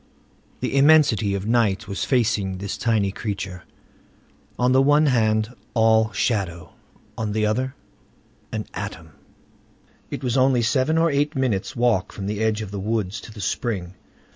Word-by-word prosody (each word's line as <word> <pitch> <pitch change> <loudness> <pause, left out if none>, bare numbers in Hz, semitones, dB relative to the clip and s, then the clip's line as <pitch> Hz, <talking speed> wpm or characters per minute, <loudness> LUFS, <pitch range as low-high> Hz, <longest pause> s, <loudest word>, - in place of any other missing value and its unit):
The - - -2
immensity 140 -9 +4
of 100 0 -4
night 110 -3 +1
was 100 0 -3
facing 105 -7 +1
this 100 +1 -4
tiny 110 -5 +1
creature. 100 -4 -5 0.9
On 125 +1 +2
the 130 +1 +5
one 145 +3 +4
hand, 110 -3 +1 0.2
all 110 -1 +4
shadow; 90 -9 -2 0.4
on 105 -2 -3
the 110 0 +1
other, 130 +5 -1 0.8
an - - -3
atom. 80 -1 -7 1.0
It 130 - -6
was 125 0 0
only 130 -2 +3
seven 130 +7 +1
or 165 0 +3
eight 145 +2 0
minutes' 130 -3 -1
walk 120 -1 +1
from 100 - -7
the 105 +2 -2
edge 110 -1 0
of 100 - -8
the 100 - -4
woods 105 -1 -2
to - - -11
the 105 -1 -9
spring. 95 -5 -2
110 Hz, 155 wpm, -23 LUFS, 100-130 Hz, 1.0 s, the